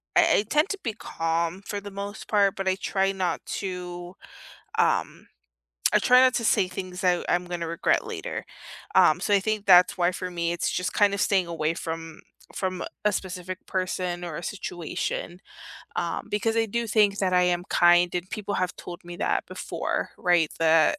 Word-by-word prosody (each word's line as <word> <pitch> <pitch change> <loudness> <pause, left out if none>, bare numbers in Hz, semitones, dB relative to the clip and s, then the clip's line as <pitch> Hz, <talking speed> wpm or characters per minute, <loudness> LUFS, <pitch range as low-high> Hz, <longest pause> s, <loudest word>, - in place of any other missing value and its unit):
I 335 -2 +5
I - - 0
tend 300 +6 +3
to 400 - -3
be 225 - -2
calm 165 -1 -2
for 205 - -3
the 205 0 -9
most 200 +2 -6
part, 200 -2 +3
but 195 0 -4
I 190 - +3
try 195 -1 0
not 185 -2 -2 0.2
to, 180 -1 -6 0.6
um, - - +1 0.7
I - - +6
try 250 0 +6
not 260 0 +5
to 230 - -1
say 185 - +3
things 185 0 -6
that 180 -1 +2
I'm 175 0 +1
gonna 175 -2 -4
regret 170 - +1
later. - - -5 0.5
Um, - - +6
so 205 - 0
I 200 - +6
think 215 0 -2
that's 180 -1 +6
why 175 0 +2
for 185 0 -5
me 170 -1 -1
it's 175 - -1
just 180 - -2
kinda 200 -1 +3
staying 190 -3 +2
away 165 -1 -1
from 165 -1 -6 0.3
from 185 -1 -2 0.2
a 210 - +4
specific 185 -1 -5
person 180 -1 -2
or 160 -3 -5
a 175 - -7
situation, 175 -1 -4 0.6
um, - - -2
because 225 +2 0
I 225 - +2
do 235 +2 -2
think 210 -2 +3
that 185 -2 +1
I 180 - +5
am 175 0 +1
kind 175 0 +5
and 180 +1 -3
people 205 -1 -4
have 185 -1 -1
told 175 +1 -9
me 175 0 -8
that - - 0
before, - - -3
right? 175 -3 +3
That, 165 - +4
185 Hz, 190 wpm, -26 LUFS, 175-205 Hz, 0.7 s, I